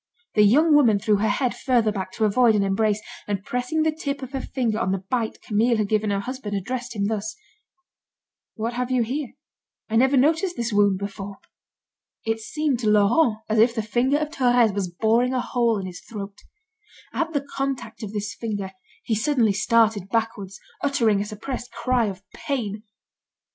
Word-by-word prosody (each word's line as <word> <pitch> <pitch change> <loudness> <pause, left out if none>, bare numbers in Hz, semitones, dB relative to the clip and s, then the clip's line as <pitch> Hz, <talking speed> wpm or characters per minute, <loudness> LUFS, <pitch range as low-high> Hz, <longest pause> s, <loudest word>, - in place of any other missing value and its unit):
The 210 - +4
young 295 +10 +5
woman 245 -8 +5
threw 210 +1 +2
her 215 +2 +1
head 240 +3 0
further 240 -4 +2
back, 190 -2 -4
to 220 - +1
avoid 225 +2 +4
an 205 - +2
embrace, 205 +2 +1 0.3
and 200 -2 -2
pressing 250 +8 -1
the 315 - +2
tip 280 -3 -4
of 260 - -7
her 270 -2 -3
finger 230 -6 -1
on 210 -5 0
the 195 - +1
bite 235 -3 -1
Camille 230 +2 +2
had 210 -2 0
given 215 -1 +1
her 200 -1 0
husband, 235 -3 -4
addressed 240 +4 -4
him 200 -1 0
thus: 215 0 -2 1.2
"What 230 +1 -3
have 250 +1 -2
you 255 -2 +2
here? 260 +3 -4 0.6
I 225 - +3
never 265 +3 +4
noticed 320 +7 +2
this 235 -2 -2
wound 205 -2 +4
before." 200 0 -6 0.9
It 225 0 0
seemed 290 +2 -1
to 220 -3 +1
Laurent 215 +3 +3
as 220 0 +1
if 235 +2 +4
the 220 - -1
finger 245 +6 +1
of 300 0 -2
Thérèse 245 -7 +3
was 195 -2 -2
boring 230 +8 +1
a - - +1
hole 235 -2 +1
in 195 - -4
his 180 -1 -8
throat. 200 -2 -8 0.7
At 330 0 -1
the 285 -1 -1
contact 270 -5 -3
of 210 -3 -5
this 210 -1 -3
finger, 205 -4 -4 0.3
he 225 - -1
suddenly 220 -1 +2
started 215 -1 +2
backward, 225 -3 -1 0.3
uttering 230 -8 +2
a - - -2
suppressed 235 +3 -6
cry 250 -3 +1
of 190 -1 -6
pain. 220 -7 -3
225 Hz, 185 wpm, -24 LUFS, 205-255 Hz, 1.2 s, young